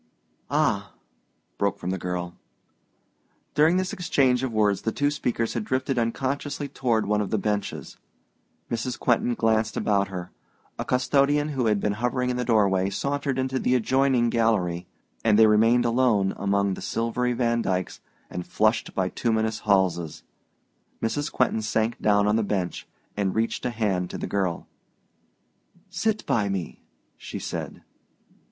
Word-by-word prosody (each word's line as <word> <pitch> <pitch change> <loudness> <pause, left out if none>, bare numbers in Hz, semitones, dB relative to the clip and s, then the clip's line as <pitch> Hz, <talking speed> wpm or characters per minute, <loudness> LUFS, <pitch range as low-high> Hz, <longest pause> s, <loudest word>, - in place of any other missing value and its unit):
"Ah!" - - 0 0.7
broke 100 -1 +1
from 90 - -4
the 95 - -1
girl. 90 0 -3 1.2
During 160 +4 +4
this 185 0 -1
exchange 130 -8 +2
of 130 -2 -2
words 105 -3 +2
the 110 - -1
two 145 +4 +1
speakers 120 -5 -1
had 115 - -2
drifted 130 +2 -1
unconsciously 140 +5 -2
toward 120 -5 0
one 105 +1 +1
of 100 - -3
the 110 - +1
benches. 105 0 -3 0.7
Mrs. 120 +2 -2
Quentin 120 0 +1
glanced 110 -1 +1
about 100 -1 +1
her: 90 -2 -7 0.5
a - - -2
custodian 140 +3 +2
who 130 -5 0
had 105 -2 +2
been 105 +1 0
hovering 125 +3 -1
in - - -2
the 125 - 0
doorway 100 -5 +2
sauntered 140 +5 -2
into 130 0 -1
the 125 - +2
adjoining 130 0 +2
gallery, 95 -7 +1 0.4
and 110 -2 +4
they 110 - +8
remained 115 +3 +4
alone 115 -5 +2
among 100 0 +1
the - - -7
silvery 120 +2 -1
Vandykes 115 -6 0 0.3
and 90 - -6
flushed 110 +1 +1
bituminous 110 +3 0
Halses. 85 -6 +1 0.8
Mrs. 145 +6 -2
Quentin 125 -3 +1
sank 110 +1 0
down 105 -1 +3
on 105 +1 +3
the - - +2
bench 95 -4 -2 0.3
and 100 -2 -1
reached 115 +2 -1
a - - 0
hand 100 -6 -1
to - - -5
the - - -4
girl. 95 -4 -2 1.2
"Sit 210 +3 -1
by 105 -3 +1
me," 95 -5 -4 0.4
she - - -7
said. - - -6
110 Hz, 150 wpm, -25 LUFS, 100-125 Hz, 1.2 s, they